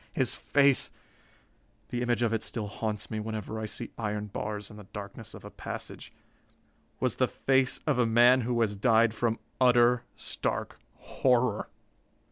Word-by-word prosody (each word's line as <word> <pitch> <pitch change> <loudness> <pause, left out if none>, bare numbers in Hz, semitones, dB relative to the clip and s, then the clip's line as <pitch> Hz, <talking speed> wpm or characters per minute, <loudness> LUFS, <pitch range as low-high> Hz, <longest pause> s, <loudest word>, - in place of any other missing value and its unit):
His - - 0
face 140 -2 +3 1.0
the 120 - -2
image 120 -1 +1
of 115 -1 +1
it 110 - 0
still 110 -1 -3
haunts 105 +1 -4
me 110 - -2
whenever 110 0 -4
I 110 - -3
see - - -6
iron 105 -1 -2
bars 105 +1 -5
in 105 - -11
the 105 - -11
darkness 105 +3 -8
of - - -11
a - - -9
passage - - -7 0.9
was - - 0
the - - +3
face 130 -1 +1
of 145 -5 +1
a 120 - +4
man 120 +3 +6
who 120 0 0
has 105 -3 +2
died 110 +2 +4
from 115 0 0 0.2
utter, 120 -1 +5
stark - - -3 0.2
horror. 125 -4 +1
115 Hz, 160 wpm, -29 LUFS, 105-125 Hz, 1.0 s, man